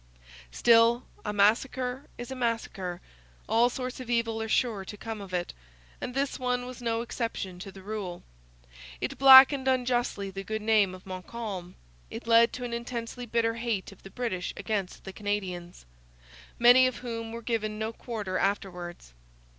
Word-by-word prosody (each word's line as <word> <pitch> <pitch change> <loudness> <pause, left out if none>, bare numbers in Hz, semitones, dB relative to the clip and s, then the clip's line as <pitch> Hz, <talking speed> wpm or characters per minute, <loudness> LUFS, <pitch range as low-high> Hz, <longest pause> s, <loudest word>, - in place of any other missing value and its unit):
Still, 235 - +5 0.2
a 210 - -2
massacre 250 +6 +1
is 240 +1 -7
a - - -4
massacre; 225 -7 -2 0.5
all 235 +2 +4
sorts 255 0 -5
of 255 -2 -8
evil 230 -2 0
are 220 - -4
sure 215 -4 +1
to 205 +2 -9
come 225 0 -6
of 195 -2 -9
it; 175 -1 -2 0.5
and 250 - -5
this 275 0 -1
one 250 -1 -1
was 250 0 -9
no 230 -1 0
exception 230 -6 -4
to 195 +2 -8
the 190 0 -13
rule. 200 -4 -5 0.8
It - - -4
blackened 265 0 +9
unjustly 245 -6 0
the 195 +1 -6
good 220 +2 -4
name 210 -4 +3
of 185 - -15
Montcalm. 190 -1 -6 0.3
It - - -7
led 230 0 +6
to 250 - -5
an 240 -1 -4
intensely 235 +1 -5
bitter 230 0 +1
hate 230 -5 -3
of 195 - -16
the 195 - -11
British 205 -6 -3
against 200 -4 -3
the 190 - -8
Canadians, 190 - -4 0.7
many 245 +2 +7
of 255 - -3
whom 230 -1 -4
were 230 +1 -7
given 215 -2 -2
no 220 +1 -3
quarter 215 -6 -4
afterwards. 180 - -3
225 Hz, 165 wpm, -28 LUFS, 195-245 Hz, 0.8 s, blackened